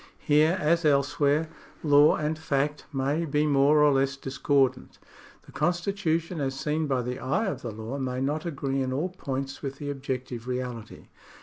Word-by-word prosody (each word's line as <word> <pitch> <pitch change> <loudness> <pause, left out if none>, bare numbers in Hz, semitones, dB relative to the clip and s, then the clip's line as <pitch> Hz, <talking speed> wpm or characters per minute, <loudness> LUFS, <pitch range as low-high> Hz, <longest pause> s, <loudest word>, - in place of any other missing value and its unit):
Here, 155 +4 +3
as 170 +1 +2
elsewhere, 145 +1 +2 0.4
law 145 -1 +6
and 155 +1 -1
fact 150 -1 -1
may 140 +4 0
be 150 -1 +1
more 145 +1 +4
or 145 -1 +5
less 135 0 +1
discordant. 135 -1 0 0.5
The - - -16
constitution 175 -2 -1
as 135 -1 -2
seen 155 +1 -1
by 130 -3 0
the 125 +1 -4
eye 185 +13 0
of 195 - -3
the 120 - -5
law 110 +5 -6
may 130 -1 -2
not 145 +4 -1
agree 140 -5 -2
in 130 -1 -1
all 155 +8 -1
points 135 -6 -5
with 135 -1 -5
the 145 0 -4
objec 130 -2 -4
tive 120 -1 -8
reality. 125 -3 -5
140 Hz, 175 wpm, -27 LUFS, 135-155 Hz, 0.5 s, law